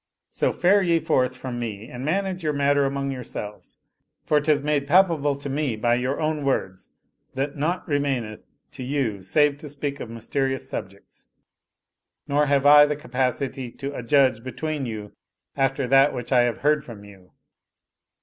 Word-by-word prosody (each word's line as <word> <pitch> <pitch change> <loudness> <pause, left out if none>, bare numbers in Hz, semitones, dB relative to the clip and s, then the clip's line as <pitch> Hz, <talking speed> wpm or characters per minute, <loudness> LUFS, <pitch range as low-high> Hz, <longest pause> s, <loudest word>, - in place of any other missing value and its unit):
So - - 0
fare 195 +3 +3
ye 170 -3 +2
forth 130 -4 0
from 125 -2 -5
me 110 -2 -5
and 125 +1 -8
manage 185 +4 -1
the 155 -2 0
matter 140 0 +2
among 140 0 -2
yourselves, 110 -5 -7 0.5
for 150 -1 +3
'tis 150 -1 +2
made 145 -1 -1
palpable 160 -4 +3
to 140 +1 -7
me 140 -3 -1
by 120 +2 +1
your 125 +3 -1
own 155 -1 -1
words 95 -9 -2 0.5
that 140 +2 -2
naught 170 +5 -2
remaineth 135 -8 -2 0.3
to - - -10
you 125 -7 -2
save 145 +10 +2
to 150 - -9
speak 145 0 -4
of 115 - -7
mysterious 135 +4 -2
subjects; 100 -1 -9 1.0
nor 145 +1 +2
have 140 0 +2
I 145 0 +8
the 150 - -1
capacity 130 -1 -2
to 140 +1 -6
adjudge 125 -2 +2
be 130 - -6
tween 155 -1 -3
you 105 -2 -6 0.4
after 135 0 0
that 135 +3 +4
which 120 +1 -6
I 125 -2 +5
have 120 - -3
heard 150 +1 +2
from 110 -4 -11
you. 95 -3 -17
140 Hz, 170 wpm, -24 LUFS, 120-150 Hz, 1.0 s, I